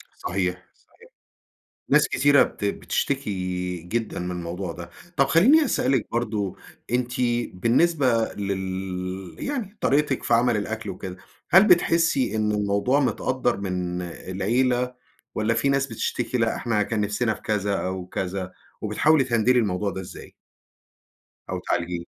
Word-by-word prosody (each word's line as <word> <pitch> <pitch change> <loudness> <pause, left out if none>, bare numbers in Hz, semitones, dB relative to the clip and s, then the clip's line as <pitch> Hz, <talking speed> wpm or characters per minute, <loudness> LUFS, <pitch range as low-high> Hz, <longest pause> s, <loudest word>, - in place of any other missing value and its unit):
صحيح، 90 0 -2
صحيح - - -22 0.8
ناس - - +5
كتيرة 145 0 +5
بت 105 - -5
بتشتكي 90 -7 -2
جدًا 110 +5 -3
من 90 0 -3
الموضوع 90 +1 -4
ده، 85 +1 -9 0.3
طَب 140 -1 +4
خليني 265 - +5
أسألِك 130 - +1
برضه 110 -5 -1 0.4
أنتِ 125 0 0 0.4
بالنسبة 120 - +2
لل 95 -2 -4
يعني 225 -8 -4
طريقتك 140 -1 +1
في 120 - +1
عمل 120 -1 +3
الأكل 110 0 -4
وكده، 95 0 -7 0.3
هل 190 +3 +7
بتحسي 165 - +3
إن 105 -1 +1
الموضوع 105 +6 +1
متقدّر 130 -3 0
من 90 -2 -3
العيلة، 120 +8 -1 0.4
والّا 110 +2 +1
في 115 +4 +1
ناس 140 0 +2
بتشتكي 125 -1 -2
لأ 115 -1 +1
إحنا 110 -3 0
كان 110 -1 -2
نفسنا 110 +2 0
في - - -12
كذا 100 -2 0
أو 95 -1 -3
كذا، 95 0 -4 0.3
وبتحاولي 155 -2 +3
تهندلي 125 0 +3
الموضوع 100 -2 0
ده 95 - -5
إزاي؟ 90 - -11 1.2
أو - - -2
تعالجيه. 85 0 -2
110 Hz, 135 wpm, -24 LUFS, 95-130 Hz, 1.2 s, هل